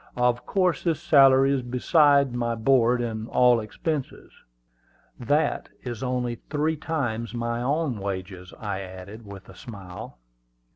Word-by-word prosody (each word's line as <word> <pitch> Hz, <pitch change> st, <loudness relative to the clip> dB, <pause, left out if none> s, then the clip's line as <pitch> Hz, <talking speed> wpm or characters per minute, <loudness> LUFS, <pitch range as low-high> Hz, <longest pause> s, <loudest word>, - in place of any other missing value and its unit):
"Of 125 Hz, 0 st, +1 dB
course 185 Hz, -3 st, +1 dB
this 165 Hz, -4 st, 0 dB
salary 135 Hz, -4 st, +5 dB
is 135 Hz, -, 0 dB
besides 140 Hz, +2 st, +3 dB
my 120 Hz, -1 st, -1 dB
board 120 Hz, 0 st, +3 dB
and 110 Hz, -1 st, -4 dB
all 125 Hz, -1 st, +4 dB
expenses." 135 Hz, +6 st, -4 dB, 0.9 s
"That 145 Hz, +5 st, 0 dB
is 120 Hz, -3 st, -6 dB
only 125 Hz, -2 st, -2 dB
three 155 Hz, +1 st, 0 dB
times 120 Hz, -8 st, -3 dB
my 120 Hz, 0 st, -2 dB
own 140 Hz, -2 st, -1 dB
wages," 95 Hz, -2 st, -6 dB
I 100 Hz, -3 st, -4 dB
added 100 Hz, +3 st, -10 dB
with 100 Hz, -1 st, -11 dB
a -, -, -13 dB
smile. 95 Hz, -, -10 dB
120 Hz, 135 wpm, -25 LUFS, 110-140 Hz, 0.9 s, salary